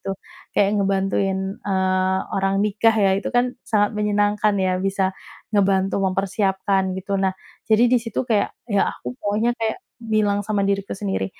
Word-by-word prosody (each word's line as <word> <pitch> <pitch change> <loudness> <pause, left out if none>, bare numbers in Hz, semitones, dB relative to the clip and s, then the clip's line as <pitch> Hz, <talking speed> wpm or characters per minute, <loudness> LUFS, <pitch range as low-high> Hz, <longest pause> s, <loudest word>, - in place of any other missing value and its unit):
gitu, 195 0 -4 0.4
kayak 200 - +4
ngebantuin, 195 0 0
eee, 190 -1 +1
orang 195 0 +1
nikah 215 +2 +2
ya, 195 - +4
itu - - -4
kan 245 +1 +2 0.2
sangat 205 -2 +2
menyenangkan 210 0 +1
ya 185 -1 0
bisa 195 0 0 0.4
ngebantu 195 -1 +2
mempersiapkan 190 0 0
gitu. 195 +1 -2
Nah 190 -1 0 0.3
jadi 220 +2 +5
di 245 0 +3
situ 230 +2 -3
kayak 220 -4 +1 0.2
ya 205 -3 +2
aku - - -6
pokonya 210 +4 +1
kayak 220 -1 0 0.2
bilang 215 -3 +1
sama 210 -2 0
diriku 195 0 -1
sendiri, 95 - -2
195 Hz, 155 wpm, -22 LUFS, 190-210 Hz, 0.4 s, jadi